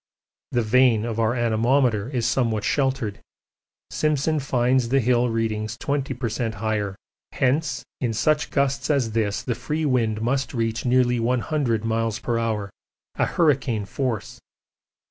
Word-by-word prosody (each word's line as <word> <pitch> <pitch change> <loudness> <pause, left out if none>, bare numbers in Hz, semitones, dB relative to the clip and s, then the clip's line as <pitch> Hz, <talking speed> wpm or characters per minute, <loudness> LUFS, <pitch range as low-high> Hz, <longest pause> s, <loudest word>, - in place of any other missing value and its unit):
The 120 -1 +1
vane 115 -1 +4
of 115 -1 -3
our 115 +2 +2
anemometer 120 -1 +2
is 125 -4 -1
somewhat 115 -3 +1
sheltered: 130 -7 0 0.7
Simpson 155 0 +1
finds 125 -2 +1
the 135 +2 +3
hill 125 0 +2
readings 110 0 -2
20 140 -2 -2
per 125 0 -2
cent. 115 0 -2
higher. 105 -2 -2 0.4
Hence 140 +4 0 0.2
in 120 -3 0
such 150 +8 +1
gusts 140 -1 0
as 135 -7 +1
this 110 -2 -1
the 125 - -1
free 155 +6 -3
wind 115 -6 +1
must 130 +4 -1
reach 115 0 -1
nearly 125 -1 +3
100 120 -1 0
m.p.h. 115 -1 -1 0.5
a - - +4
hurricane 135 - +1
force. 120 +1 -3
120 Hz, 135 wpm, -24 LUFS, 110-135 Hz, 0.7 s, vane